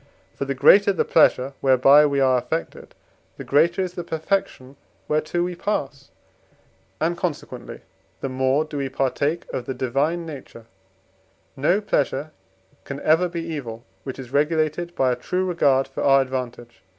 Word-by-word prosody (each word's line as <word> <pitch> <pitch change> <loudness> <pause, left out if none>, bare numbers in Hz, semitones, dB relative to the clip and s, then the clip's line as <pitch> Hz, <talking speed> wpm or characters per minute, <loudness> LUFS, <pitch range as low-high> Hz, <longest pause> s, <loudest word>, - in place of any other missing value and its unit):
For 140 - -4
the 135 0 -3
greater 200 +9 +6
the 190 - 0
pleasure 140 -4 +3
whereby 135 +3 +6
we 140 -1 0
are 130 -1 +4
affected, 140 +7 -5 0.4
the - - -7
greater 170 +6 +2
is 180 -1 -5
the 175 - -5
perfection 160 -5 -3 0.3
whereto 155 +3 0
we 180 0 -3
pass, 140 -7 -4 0.9
and 165 +2 0
consequently 170 -3 -5 0.4
the - - -3
more 130 +3 +1
do 150 -1 -7
we 135 -1 -2
partake 140 +5 -1
of 120 - -4
the 135 - -3
divine 140 +7 -1
nature: 135 -7 -10 0.9
no 170 +9 +1
pleasure 145 -5 -1 0.5
can 140 0 -7
ever 165 +3 +3
be 170 -1 -4
evil, 130 -9 -6 0.2
which 130 - -6
is 130 -2 -9
regulated 155 +3 0
by 130 -1 +2
a - - 0
true 180 +9 -2
regard 140 -7 +2
for - - -6
our 135 -1 +5
advantage. 125 -2 -6
145 Hz, 155 wpm, -23 LUFS, 130-170 Hz, 0.9 s, greater